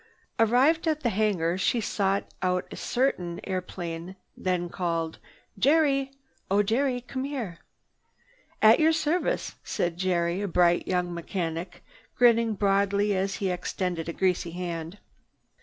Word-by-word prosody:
Arrived 260 Hz, +9 st, +4 dB
at 310 Hz, -1 st, +1 dB
the 235 Hz, -, +1 dB
hangar 190 Hz, -4 st, +1 dB
she 235 Hz, +5 st, +2 dB
sought 200 Hz, -2 st, 0 dB, 0.2 s
out 180 Hz, 0 st, 0 dB
a -, -, -6 dB
certain 180 Hz, -10 st, -1 dB
airplane, 180 Hz, -1 st, -5 dB, 0.2 s
then 180 Hz, -1 st, -1 dB
called: 165 Hz, -2 st, -2 dB, 0.4 s
"Jerry! 275 Hz, 0 st, +3 dB, 0.4 s
Oh 200 Hz, +2 st, +3 dB
Jerry! 245 Hz, +4 st, 0 dB
Come 260 Hz, +1 st, -5 dB
here!" 240 Hz, -12 st, -4 dB, 1.0 s
"At 220 Hz, +1 st, +7 dB
your 320 Hz, +1 st, +4 dB
service!" 330 Hz, +9 st, -1 dB
said 170 Hz, -1 st, -2 dB
Jerry, 175 Hz, 0 st, 0 dB
a 205 Hz, -, -1 dB
bright 175 Hz, -1 st, +3 dB
young 180 Hz, -1 st, 0 dB
mechanic, 170 Hz, 0 st, -4 dB, 0.3 s
grinning 230 Hz, -2 st, +4 dB
broadly 200 Hz, +1 st, +2 dB
as 195 Hz, +1 st, -1 dB
he 195 Hz, -2 st, -1 dB
extended 180 Hz, -2 st, -3 dB
a -, -, -3 dB
greasy 180 Hz, -1 st, 0 dB
hand. 170 Hz, 0 st, -5 dB
190 Hz, 130 wpm, -27 LUFS, 175-235 Hz, 1.0 s, At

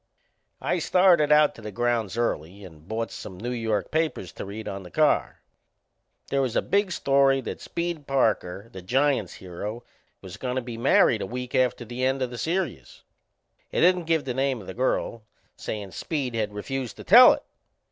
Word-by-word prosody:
I -, -, 0 dB
started 175 Hz, -5 st, +4 dB
out 150 Hz, 0 st, +5 dB
to -, -, -13 dB
the 105 Hz, -1 st, -7 dB
grounds 115 Hz, -1 st, -1 dB
early 100 Hz, -4 st, -2 dB
and 80 Hz, -3 st, -14 dB
bought 115 Hz, +2 st, -3 dB
some 95 Hz, -, -8 dB
New 120 Hz, +6 st, -4 dB
York 110 Hz, -5 st, -2 dB
papers 155 Hz, -, -1 dB
to -, -, -7 dB
read 105 Hz, +3 st, -7 dB
on 100 Hz, 0 st, -5 dB
the 90 Hz, -, -11 dB
car. -, -, +1 dB, 0.9 s
They 140 Hz, -, +1 dB
was 130 Hz, -4 st, -1 dB
a -, -, +2 dB
big 200 Hz, -1 st, +1 dB
story 135 Hz, -4 st, +3 dB
that -, -, -6 dB
Speed 170 Hz, -4 st, -4 dB
Parker, 110 Hz, -7 st, 0 dB
the 95 Hz, -, -9 dB
Giants' 130 Hz, 0 st, +1 dB
hero, 105 Hz, +6 st, -7 dB, 0.4 s
was 95 Hz, -2 st, -10 dB
goin' 125 Hz, -1 st, -3 dB
to 130 Hz, -, 0 dB
be 120 Hz, -1 st, -6 dB
married 115 Hz, -1 st, +3 dB
a -, -, -3 dB
week 125 Hz, +2 st, -6 dB
after 125 Hz, -2 st, +1 dB
the 120 Hz, +3 st, -5 dB
end 130 Hz, 0 st, +1 dB
o' -, -, +2 dB
the 120 Hz, -1 st, -8 dB
serious. 160 Hz, -, -3 dB, 0.7 s
It -, -, 0 dB
didn't 180 Hz, 0 st, +4 dB
give 160 Hz, -2 st, +1 dB
the 125 Hz, -, -2 dB
name 135 Hz, -1 st, 0 dB
o' 100 Hz, -, -11 dB
the 95 Hz, -, -7 dB
girl, 120 Hz, -1 st, -1 dB, 0.3 s
sayin' 100 Hz, -3 st, -6 dB
Speed 130 Hz, -, -3 dB
had 110 Hz, -3 st, -1 dB
refused 125 Hz, +4 st, -5 dB
to -, -, -9 dB
tell 245 Hz, +6 st, +9 dB
it. -, -, -6 dB
120 Hz, 190 wpm, -25 LUFS, 105-140 Hz, 0.9 s, tell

